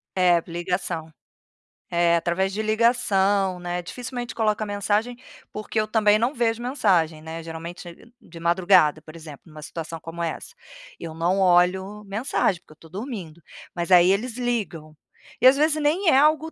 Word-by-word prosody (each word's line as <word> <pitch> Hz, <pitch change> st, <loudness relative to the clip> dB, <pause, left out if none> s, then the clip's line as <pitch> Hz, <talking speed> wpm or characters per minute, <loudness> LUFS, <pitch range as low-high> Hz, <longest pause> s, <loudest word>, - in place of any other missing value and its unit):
É, 175 Hz, -2 st, +3 dB
ligação. 170 Hz, -2 st, -4 dB, 0.8 s
É, 170 Hz, 0 st, +2 dB
através 180 Hz, +3 st, 0 dB
de 215 Hz, -, -2 dB
ligação, 205 Hz, -4 st, +1 dB
né. 175 Hz, 0 st, -4 dB
Dificilmente 245 Hz, +5 st, -6 dB
coloca 215 Hz, -1 st, 0 dB
mensagem, 205 Hz, +4 st, -1 dB, 0.4 s
porque 215 Hz, +1 st, -3 dB
eu 215 Hz, -, 0 dB
também 215 Hz, -1 st, +3 dB
não 240 Hz, +5 st, 0 dB
vejo 230 Hz, -1 st, 0 dB
mensagem, 180 Hz, -, +1 dB
né, 160 Hz, +1 st, -7 dB
geralmente 170 Hz, +6 st, -9 dB
de 165 Hz, 0 st, -14 dB
madrugada, 170 Hz, -3 st, +3 dB
por 155 Hz, +1 st, -14 dB
exemplo, 155 Hz, -3 st, -11 dB
em 160 Hz, -, -16 dB
uma 155 Hz, 0 st, -11 dB
situação 165 Hz, +1 st, -7 dB
como 165 Hz, +1 st, -7 dB
essa, 170 Hz, -, -5 dB, 0.4 s
eu 165 Hz, -2 st, -7 dB
não 175 Hz, +4 st, 0 dB
olho 190 Hz, +3 st, +2 dB
mensagem, 200 Hz, -3 st, -1 dB
porque -, -, -22 dB
eu -, -, -26 dB
estou 160 Hz, +1 st, -18 dB
dormindo, 185 Hz, -, -7 dB, 0.3 s
mas 170 Hz, +1 st, -3 dB
aí 180 Hz, +1 st, +7 dB
eles 230 Hz, +4 st, -2 dB
ligam, 175 Hz, -11 st, -3 dB, 0.4 s
e -, -, 0 dB
às 260 Hz, -, +7 dB
vezes 305 Hz, +1 st, +1 dB
nem 330 Hz, +5 st, +2 dB
é 265 Hz, -, +5 dB
algo 310 Hz, +2 st, +3 dB
190 Hz, 165 wpm, -23 LUFS, 170-225 Hz, 0.8 s, aí